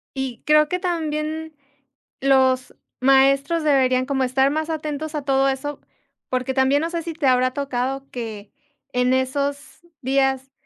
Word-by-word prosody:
Y 265 -3 -4
creo 305 0 +5
que 360 - -1
también 315 -3 -3 0.7
los 260 -1 +2 0.3
maestros 275 +4 +3
deberían 260 -3 +3
como 270 -1 0
estar 265 +2 +2
más 315 +2 -2
atentos 310 0 -4
a 295 - -3
todo 270 0 +2
eso, 280 +2 -4 0.5
porque 255 +1 -1
también, 270 +2 +3
no 330 - -1
sé, 335 -1 -3
si 335 0 -5
te 305 -3 -1
habrá 255 0 +3
tocado 270 0 -3
que 220 -4 -7 0.4
en 250 +1 +2
esos 280 +4 -2 0.2
días 270 0 0
275 Hz, 145 wpm, -22 LUFS, 260-305 Hz, 0.7 s, creo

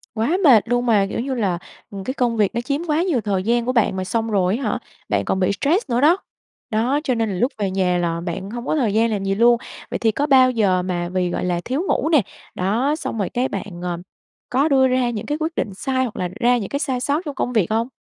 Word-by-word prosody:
Quá 255 +12 +1
mệt 240 -9 +7
luôn 245 0 +1
mà! 210 -4 +3
Kiểu - - -3
như 265 +3 -2
là, 195 -7 0 0.3
ừm, 195 -1 -6
cái 260 - -3
công 240 -4 0
việc 210 +1 +1
nó 235 - 0
chiếm 280 +5 -2
quá 305 +2 +2
nhiều 315 -11 +1
thời 195 -3 -1
gian 235 +2 +1
của 255 - +1
bạn 230 -6 +2
mà, 185 - -2
xong 225 +3 -1
rồi 190 +1 +2
á 275 - -5
hả, - - -1 0.3
bạn - - 0
còn 190 - 0
bị 185 - +2
stress 335 - +1
nữa 240 +1 +1
đó. 330 +6 +5 0.5
Đó, 240 +7 +1
cho 255 -4 0
nên 225 -2 0
là 190 - -3
lúc 245 +9 +1
về 200 -3 -1
nhà 185 -2 +1
là 170 -1 -1
bạn 180 +3 -5
hông 240 +1 -6
có - - 0
thời 235 -9 +1
gian 225 +1 +2
làm 200 -2 -2
gì 195 0 0
luôn. 235 +2 +5 0.3
Vậy - - -1
thì 225 -1 +2
có 285 - -1
bao 260 -2 +6
giờ 195 -6 +2
mà 175 -1 -2
vì, 180 -1 0
gọi 175 - -2
là, 175 -1 -1
thiếu 270 +6 -1
ngủ 315 - +1
nè. 305 -5 +5 0.3
Đó, 230 +11 +1
xong 310 -7 -5
rồi 200 - -1
cái 250 +2 0
bạn, 195 -3 -6
ờ, 175 -1 -2 0.5
có 275 +5 +2
đưa 265 -2 +4
ra 255 -1 +1
những 215 -3 -4
cái 295 +1 -2
quyết 320 0 -2
định 200 - -2
sai 260 +6 -1
hoặc 225 - -6
là 180 -1 -2
ra 245 0 +4
những 205 -5 -4
cái 280 - -2
sai 260 -4 -1
sót 285 +5 0
trong 290 -3 -5
công 250 - -2
việc 215 -4 +1
hông? 225 +2 +1
230 Hz, 275 wpm, -21 LUFS, 195-260 Hz, 0.5 s, mệt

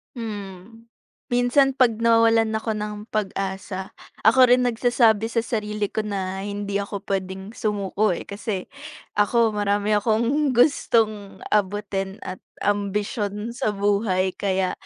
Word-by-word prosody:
Hmm. 215 0 -8 0.4
Minsan 245 +3 +3
'pag 240 -4 +3
nawawalan 225 -1 +4
ako 220 0 -2
ng 210 0 -3 0.2
pag-asa, 190 -2 -3 0.3
ako 255 +4 +6
rin 250 +1 +4
nagsasabi 230 -2 +3
sa 230 0 -1
sarili 210 -3 -2
ko - - -2
na 195 -3 -3
hindi 200 0 -3
ako 200 0 -5
pwedeng 190 0 -4
sumuko, 205 -3 0
eh. - - -6
Kasi 200 -2 -4 0.6
ako, 225 +2 +3
marami 205 0 0
akong 235 +6 +1
gustong 220 -6 +2
abutin 195 -1 -1
at 185 0 -6 0.2
ambisyon 205 +1 -1
sa 215 -3 -2
buhay. 200 -2 +1
Kaya 190 -2 0
210 Hz, 120 wpm, -23 LUFS, 200-230 Hz, 0.6 s, ako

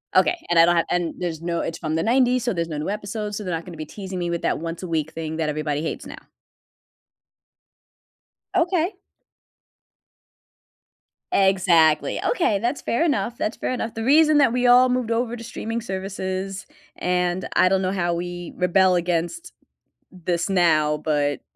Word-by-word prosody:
Okay, 355 - +4
and 170 -1 +4
I 165 - +8
don't 175 - +3
have 165 -1 +2
and 175 -2 -1
there's 165 -3 -4
no 170 0 -2
it's 165 - -4
from 155 -1 -2
the 165 - 0
'90s, 250 +1 +3
so 240 -3 0
there's 170 -1 -2
no 150 - -4
new 150 - -3
episodes, 210 0 -4
so 210 - -5
they're 180 -2 -3
not 165 +2 -4
gonna 170 -3 -9
be 155 - -5
teasing 190 -3 -7
me 175 -1 -2
with 170 -1 -3
that - - 0
once 165 +2 -5
a 185 - -4
week 160 -1 -1
thing 160 -1 -5
that 155 -2 -1
everybody 150 -1 -2
hates 160 - -4
now. - - -9 2.4
Okay. 350 +1 +1 2.4
Exactly. 175 -5 +3
Okay, 220 - +1
that's 245 +6 -2
fair 235 - 0
enough, 285 -7 0
that's 215 - -2
fair - - -2
enough. 230 -3 -3
The 225 - -3
reason 305 +4 +5
that 275 -5 +4
we 250 0 +2
all 250 +1 +6
moved 250 -2 0
over 235 +1 0
to 230 - -9
streaming 225 +1 -4
services, 190 -1 -4 0.3
and 180 0 0
I 185 - +5
don't 190 0 +2
know 185 0 0
how 175 -3 0
we 175 0 -5
rebel 180 +1 +3
against 175 - -2 0.6
this 175 0 -2
now, 155 -5 +3
but 145 -2 -1
185 Hz, 180 wpm, -23 LUFS, 165-230 Hz, 2.4 s, I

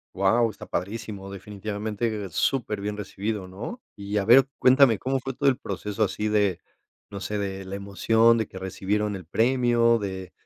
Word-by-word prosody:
Guau, 110 +5 +3
está - - -10
padrísimo, 100 -1 -5
definitivamente, 105 +1 -4
superbién 105 - -1
recibido, 100 -1 -4
¿no? 120 - -7 0.2
Y 100 +1 -5
a 100 - +2
ver, 130 +5 +7
cuéntame, 130 -4 +6
¿cómo 135 +1 -1
fue 135 +1 -5
todo 140 +2 +2
el 130 - +1
proceso 105 +2 -2
así 105 +3 -2
de, 105 -4 +1 0.5
no 100 -1 -7
sé, 105 +2 -3
de 95 -1 -4
la 95 +1 -5
emoción, 110 +4 +3
de 110 - -1
que 95 - -11
recibieron 100 +2 -2
el 90 - -11
premio, 120 +2 +3
de 95 -2 -5
105 Hz, 165 wpm, -25 LUFS, 100-115 Hz, 0.5 s, ver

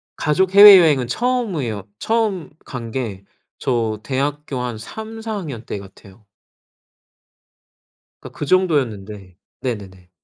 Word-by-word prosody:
가족 185 +6 0
해외여행은 175 -11 +8
처음이에요. 175 - -2 0.2
처음 215 -8 -1 0.2
간 120 -4 -7
게 110 -7 -4 0.4
저 115 -4 -1
대학교 140 +1 -3
한 125 -2 -4
3-4 220 - -7
학년 145 - -6
때 105 - -5
같아요. 100 +1 -16 1.9
그러니까 - - -12
그 - - -3
정도였는데 110 - -1 0.2
네네네. 95 -7 -6
130 Hz, 235 characters per minute, -20 LUFS, -, 1.9 s, 해외여행은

